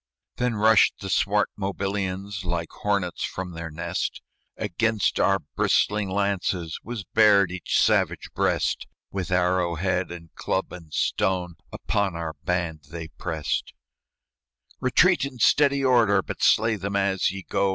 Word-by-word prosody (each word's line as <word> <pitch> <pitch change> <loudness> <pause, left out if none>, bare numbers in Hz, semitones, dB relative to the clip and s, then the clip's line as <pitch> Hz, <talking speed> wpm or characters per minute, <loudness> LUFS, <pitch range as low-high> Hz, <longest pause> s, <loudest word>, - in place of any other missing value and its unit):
Then 125 -2 0
rushed 110 -1 +4
the 95 - -5
swart 105 +1 +2
Mobilians 95 0 -3
Like 85 -1 -3
hornets 100 -4 -1
from 90 -1 -4
their 85 -1 -6
nest; 85 +2 -3 0.4
Against 110 +2 0
our 95 0 +4 0.2
bristling 105 -1 +2
lances 95 -4 -1
Was 115 -3 -5
bared 100 -4 +4
each 90 -1 -1
savage - - +1
breast; - - 0 0.2
With 95 -1 -3
arrow 90 -1 +1
head 90 +1 -1
and 85 -2 -10
club 95 - -2
and 85 -4 -11
stone, 90 +3 0 0.2
Upon 100 -4 -1
our 85 -1 -4
band 85 -4 -2
they 80 -1 -7
prest. 80 0 -3 1.1
"Retreat 170 +8 +4
in 140 -2 -4
steady 140 +2 +3
order! 110 -7 +4
But - - -7
slay 110 -1 +4
them 100 +1 -4
as 95 -1 +1
ye 95 0 -6
go!" 100 - +1
95 Hz, 140 wpm, -25 LUFS, 90-105 Hz, 1.1 s, rushed